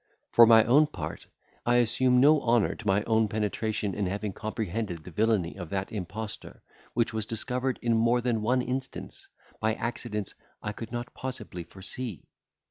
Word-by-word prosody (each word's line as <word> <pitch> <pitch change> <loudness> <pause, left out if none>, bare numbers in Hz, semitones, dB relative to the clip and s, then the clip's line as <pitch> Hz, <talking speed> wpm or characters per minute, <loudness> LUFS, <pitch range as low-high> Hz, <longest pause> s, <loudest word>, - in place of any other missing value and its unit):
For 115 -1 +8
my 110 -1 +8
own 140 +7 +5
part, - - -6 0.4
I 120 - +3
assume 125 +1 +4
no 145 +3 +6
honour 115 -3 +3
to 110 - -9
my 100 +2 +3
own 110 -1 +2
penetration 105 -1 -1
in 100 -1 -1
having 100 +1 -3
comprehended 105 -5 -3
the 90 - -10
villany 105 -3 +1
of 90 -4 -7
that 95 0 -3
impostor, 105 +2 -6 0.3
which 115 -1 +1
was 110 -1 -1
discovered, 125 +3 -2
in 120 -1 +2
more 115 +2 +3
than 120 -2 0
one 125 +3 +2
instance, 130 +1 -5 0.3
by 110 0 +1
accidents 115 -4 -3 0.3
I 105 - -4
could 115 +1 -8
not 120 +1 -5
possibly 110 -9 -6
foresee. 100 - -7
110 Hz, 165 wpm, -28 LUFS, 105-120 Hz, 0.4 s, For